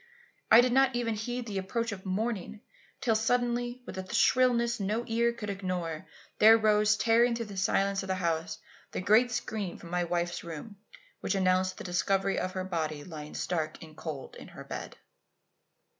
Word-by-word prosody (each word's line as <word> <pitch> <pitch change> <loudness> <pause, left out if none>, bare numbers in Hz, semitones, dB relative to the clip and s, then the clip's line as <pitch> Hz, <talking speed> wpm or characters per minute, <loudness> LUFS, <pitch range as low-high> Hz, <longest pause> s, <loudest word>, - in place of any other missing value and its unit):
I 225 +2 +9
did 250 0 +1
not 265 -1 +4
even 235 -2 0
heed 240 +3 -4
the 200 -4 -3
approach 230 +4 -2
of 195 -1 -7
morning, 215 +1 -2 0.4
till 245 -4 +2
suddenly, 240 +2 0
with - - -6
a 185 0 -7
shrillness 240 -2 +3
no 210 +4 -1
ear 235 0 +1
could 220 -3 -5
ignore, 180 -5 -4 0.3
there 220 +1 +8
rose, 215 -1 +3
tearing 235 +2 +3
through 230 0 -3
the 205 -2 -9
silence 195 +1 +1
of 190 - -7
the 190 - 0
house, 165 -2 -1 0.4
that - - -2
great 230 +4 +5
scream 220 -6 -3
from 170 - -12
my 180 0 +1
wife's 175 0 -2
room 170 +6 -8 0.4
which - - -1
announced 185 0 +2
the - - -7
discovery 195 +2 0
of 185 - -3
her 185 - -3
body 155 -5 -3
lying 150 -3 -9
stark 160 -3 -3
and 155 -1 -13
cold 155 -4 -7
in - - -11
her - - -10
bed. - - -7
200 Hz, 180 wpm, -29 LUFS, 180-235 Hz, 0.4 s, I